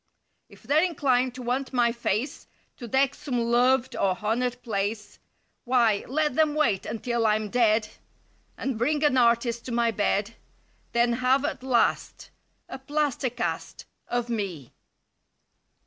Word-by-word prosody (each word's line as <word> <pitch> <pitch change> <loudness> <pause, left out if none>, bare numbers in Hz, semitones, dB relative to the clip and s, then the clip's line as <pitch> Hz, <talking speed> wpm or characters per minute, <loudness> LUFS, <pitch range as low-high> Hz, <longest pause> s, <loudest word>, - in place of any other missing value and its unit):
If - - -18
they're 300 +2 +3
inclined 260 -7 +1
to 255 - -7
want 260 +3 -2
my 240 -2 +3
face 235 +3 -3 0.3
To 240 - -8
deck 270 +3 +2
some 260 -5 -3
loved 245 +2 +2
or 185 -2 0
honored 245 +3 -1
place. 210 -1 -3 0.4
Why, 235 -5 +2
let 300 +2 0
them 305 +1 +2
wait 305 -11 +1
until 230 +1 -1
I'm 215 -1 0
dead. 220 -3 +3 0.7
And 260 -5 -3
bring 295 +5 +1
an 295 -3 +3
artist 235 -1 +2
to 255 - -6
my 235 0 +2
bed; 205 +1 0 0.6
Then 235 0 +3
have 255 +3 +2
at - - -3
last— 255 -3 0 0.4
A 265 - -8
plaster 285 -1 -1
cast— 240 0 -4 0.2
Of 245 -1 -2
me. 195 - -4
240 Hz, 140 wpm, -26 LUFS, 225-265 Hz, 0.7 s, they're